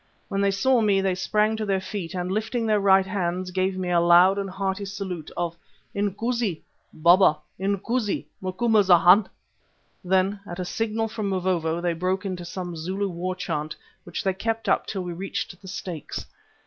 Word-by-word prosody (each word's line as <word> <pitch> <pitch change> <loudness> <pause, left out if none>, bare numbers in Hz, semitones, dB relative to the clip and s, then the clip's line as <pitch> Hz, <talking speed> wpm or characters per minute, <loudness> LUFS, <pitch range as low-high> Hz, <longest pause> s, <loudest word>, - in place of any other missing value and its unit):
When 195 -2 -1
they 200 - +3
saw 235 +6 +3
me 205 -3 +3
they 190 -1 +1
sprang 210 +4 +1
to 220 - -2
their 195 -2 +1
feet 190 -2 -5
and, 180 0 -2
lifting 225 +3 -1
their 215 -1 +3
right 195 -1 +5
hands, 185 -1 -2
gave 185 +1 0
me 180 -1 -2
a 175 - +4
loud 175 +3 +6
and 195 -1 -3
hearty 190 +1 -2
salute 190 -5 -5
of 170 -1 -2 0.4
"Inkoosi! 205 -1 -1 0.3
Baba! 170 0 +5 0.2
Inkoosi! 200 - -1 0.2
Macumazana!" 190 -1 +5 0.8
Then, 190 +2 +1
at 175 - -6
a 180 - -2
signal 225 +3 -1
from 215 -2 -3
Mavovo, 175 -3 0
they 175 -1 0
broke 185 +4 -1
into 180 -2 -4
some 175 -1 -5
Zulu 190 +5 -2
war 180 +1 -3
chant, 155 -4 -3 0.3
which - - -5
they 190 - +1
kept 225 +3 -3
up - - +2
till 190 -3 -3
we 175 -1 -4
reached 180 0 -5
the 190 - -12
stakes. 180 -3 -6
190 Hz, 175 wpm, -25 LUFS, 180-200 Hz, 0.8 s, loud